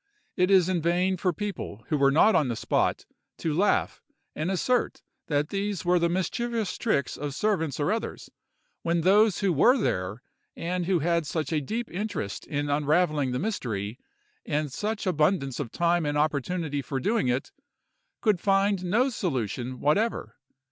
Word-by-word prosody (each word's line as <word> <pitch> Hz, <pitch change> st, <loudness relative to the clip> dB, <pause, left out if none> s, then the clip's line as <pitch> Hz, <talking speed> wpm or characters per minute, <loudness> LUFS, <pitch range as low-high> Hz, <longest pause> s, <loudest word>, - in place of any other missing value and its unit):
It 180 Hz, 0 st, +2 dB
is 190 Hz, -3 st, +5 dB
in 185 Hz, -3 st, 0 dB
vain 180 Hz, +3 st, +1 dB
for 180 Hz, 0 st, 0 dB
people 175 Hz, -, -5 dB
who 150 Hz, -, +1 dB
were 135 Hz, 0 st, +5 dB
not 165 Hz, +10 st, +5 dB
on 150 Hz, -, +3 dB
the 120 Hz, -, -2 dB
spot -, -, 0 dB, 0.3 s
to 160 Hz, -, -2 dB
laugh, 195 Hz, +7 st, +1 dB, 0.3 s
and 155 Hz, +4 st, -2 dB
assert 240 Hz, +7 st, 0 dB, 0.2 s
that 145 Hz, 0 st, 0 dB
these 200 Hz, -2 st, -2 dB
were 175 Hz, 0 st, +4 dB
the 170 Hz, 0 st, +2 dB
mischievous 220 Hz, +3 st, -1 dB
tricks 140 Hz, -, 0 dB
of 145 Hz, -1 st, -5 dB
servants 160 Hz, -8 st, 0 dB
or 145 Hz, -, +1 dB
others, 225 Hz, -, -4 dB, 0.5 s
when 170 Hz, 0 st, 0 dB
those 205 Hz, +4 st, +4 dB
who 195 Hz, -3 st, +2 dB
were 240 Hz, -, +5 dB
there, 95 Hz, -, -2 dB, 0.3 s
and 175 Hz, +1 st, -2 dB
who 185 Hz, -2 st, +3 dB
had 170 Hz, 0 st, 0 dB
such 160 Hz, +2 st, -2 dB
a 155 Hz, -, +1 dB
deep 225 Hz, -, -3 dB
interest 185 Hz, -, -4 dB
in 145 Hz, 0 st, -2 dB
unravelling 150 Hz, -1 st, +1 dB
the 125 Hz, -, -1 dB
mystery, 120 Hz, -, -3 dB, 0.4 s
and 150 Hz, -3 st, -2 dB
such 210 Hz, +4 st, -3 dB
abundance 150 Hz, -5 st, +1 dB
of 125 Hz, -6 st, -4 dB
time 170 Hz, 0 st, +1 dB
and 145 Hz, 0 st, 0 dB
opportunity 150 Hz, 0 st, -1 dB
for 135 Hz, +1 st, -3 dB
doing 210 Hz, -, +1 dB
it, 125 Hz, +2 st, -1 dB, 0.7 s
could 210 Hz, -5 st, +2 dB
find 195 Hz, -1 st, +2 dB
no 215 Hz, +9 st, +2 dB
solution 130 Hz, -, -3 dB
whatever. 205 Hz, +11 st, 0 dB
170 Hz, 165 wpm, -27 LUFS, 145-195 Hz, 0.7 s, is